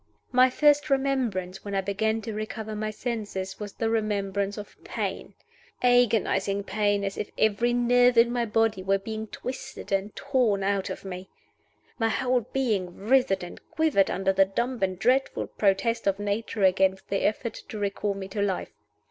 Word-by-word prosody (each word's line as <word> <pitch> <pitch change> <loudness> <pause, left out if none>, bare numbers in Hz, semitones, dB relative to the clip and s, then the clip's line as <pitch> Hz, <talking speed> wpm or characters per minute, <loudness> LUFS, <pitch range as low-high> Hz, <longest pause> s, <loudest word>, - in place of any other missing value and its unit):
My 255 0 +6
first 295 +2 +3
remembrance 250 -10 0
when 200 -1 -4
I 195 - +2
began 220 +3 -1
to 220 - -4
recover 215 0 -5
my 215 0 -2
senses 210 -4 -4
was 205 -1 -6
the 225 - -2
remembrance 200 -2 -1
of 205 - -8
Pain - - -4 0.5
agonizing 210 -5 +3
pain, 205 0 0
as 195 0 -3
if - - -3
every 220 +3 +2
nerve 245 0 +4
in 235 +1 +6
my 240 -1 0
body 215 -2 +1
were 195 +1 +2
being 220 +2 -5
twisted 265 +2 -7
and 195 +1 -1
torn 250 -8 +1
out 195 -1 0
of - - -7
me. 185 0 -7 0.7
My 225 -1 +2
whole 255 +1 +1
being 210 -10 -1
writhed 215 -3 +2
and 175 - -9
quivered 315 -12 +2
under 195 0 +1
the 195 0 +5
dumb 235 +6 -2
and 185 -1 0
dreadful 255 +7 +1
protest 200 +3 0
of 195 -1 +2
Nature 205 +1 -2
against 190 0 +2
the 195 - 0
effort 220 +2 0 0.2
to 215 - -6
recall 200 0 -1
me 195 -1 -6
to 205 +1 -3
life. 195 -2 -1
210 Hz, 170 wpm, -26 LUFS, 195-240 Hz, 0.7 s, My